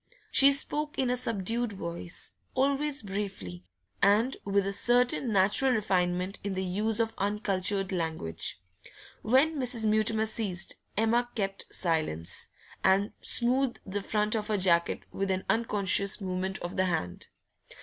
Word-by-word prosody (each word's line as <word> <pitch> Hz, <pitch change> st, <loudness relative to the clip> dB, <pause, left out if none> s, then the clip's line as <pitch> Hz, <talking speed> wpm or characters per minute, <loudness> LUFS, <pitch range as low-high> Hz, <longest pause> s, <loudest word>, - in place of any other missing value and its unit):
She 275 Hz, +1 st, +7 dB
spoke 295 Hz, +2 st, +1 dB
in 255 Hz, -2 st, +1 dB
a -, -, +2 dB
subdued 230 Hz, -1 st, 0 dB
voice, 170 Hz, -2 st, -5 dB, 0.2 s
always 280 Hz, +1 st, 0 dB
briefly, 190 Hz, -, -5 dB, 0.4 s
and 220 Hz, +6 st, +3 dB
with 200 Hz, 0 st, +1 dB
a 195 Hz, -, -2 dB
certain 245 Hz, +3 st, +2 dB
natural 205 Hz, +7 st, +4 dB
refinement 185 Hz, -3 st, 0 dB
in 200 Hz, -1 st, -3 dB
the 190 Hz, -, -1 dB
use 210 Hz, +4 st, -1 dB
of 225 Hz, -1 st, 0 dB
uncultured 200 Hz, -1 st, -1 dB
language. 160 Hz, -, -3 dB, 0.6 s
When 275 Hz, +7 st, +3 dB
Mrs. 245 Hz, -3 st, +2 dB
Mutimer 220 Hz, +1 st, +2 dB
ceased, 205 Hz, -5 st, -2 dB, 0.2 s
Emma 235 Hz, +3 st, +2 dB
kept 195 Hz, -3 st, -3 dB
silence, 155 Hz, -, -1 dB, 0.4 s
and 195 Hz, +2 st, +3 dB
smoothed 250 Hz, +1 st, +1 dB
the 200 Hz, +1 st, -3 dB
front 210 Hz, +1 st, 0 dB
of 210 Hz, -1 st, -2 dB
her 215 Hz, -2 st, 0 dB
jacket 170 Hz, -3 st, +2 dB
with 195 Hz, 0 st, -2 dB
an 190 Hz, 0 st, -1 dB
unconscious 200 Hz, -3 st, +1 dB
movement 190 Hz, 0 st, -3 dB
of 175 Hz, +2 st, -5 dB
the 185 Hz, -, +3 dB
hand. 90 Hz, -, -3 dB
205 Hz, 140 wpm, -29 LUFS, 185-235 Hz, 0.6 s, She